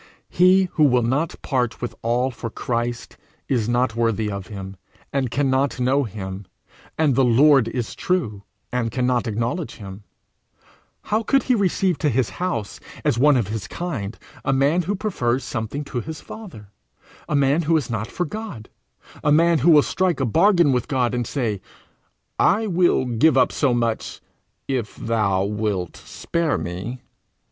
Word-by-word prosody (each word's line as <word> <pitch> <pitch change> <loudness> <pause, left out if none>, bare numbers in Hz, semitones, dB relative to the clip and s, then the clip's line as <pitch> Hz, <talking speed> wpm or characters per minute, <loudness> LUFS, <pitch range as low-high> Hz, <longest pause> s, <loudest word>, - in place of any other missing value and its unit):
He 185 +2 +5
who 155 - +4
will 125 -3 +3
not 140 +8 -1
part 125 -4 -1
with 120 - -4
all 120 +3 +1
for 115 -1 -6
Christ, 120 0 -3 0.3
is 120 -4 0
not 120 -1 +1
worthy 115 -2 0
of 100 -2 -6
him, 95 -2 -8 0.4
and 135 -3 0
cannot 135 +1 +1
know 130 +3 +2
him; 95 -2 -7 0.5
and 155 -3 +3
the 135 +2 +3
Lord 130 +1 +5
is 120 0 -3
true, 145 - -1 0.3
and 125 -2 0
cannot 125 +1 0
acknowledge 115 - -2
him: 100 -1 -9 1.0
how 215 +2 0
could 270 +5 +2
he 255 - +2
receive 190 - +1
to 150 - +2
his 125 -2 0
house, 175 - -2 0.3
as 115 - +2
one 145 0 +5
of 110 -5 -1
his 105 -3 -4
kind, 120 - -4 0.3
a - - +1
man 140 +6 +3
who 195 +4 -2
prefers 135 - -1
something 125 +5 -4
to 130 -3 -4
his 160 +4 -7
Father; 140 - -11 0.6
a 150 - 0
man 140 +3 +3
who 165 0 +2
is 140 -6 -3
not 110 -1 -2
for 180 - -3
God; 190 - -7 0.5
a 150 - +3
man 165 +1 +4
who 160 - +3
will 150 -3 +7
strike 185 -5 0
a 135 - +1
bargain 170 - +4
with 125 -2 0
God, 125 -5 0
and 120 -2 -1
say, 110 -8 -2 0.8
'I 210 +4 +3
will 175 -8 +2
give 125 +4 +3
up 130 - +4
so 140 -4 +1
much, 115 -2 -1 0.5
if 125 -6 -2
thou 105 -5 0
wilt 100 -3 -2
spare 170 -3 -2
me'! 95 +9 -5
125 Hz, 165 wpm, -22 LUFS, 115-155 Hz, 1.0 s, will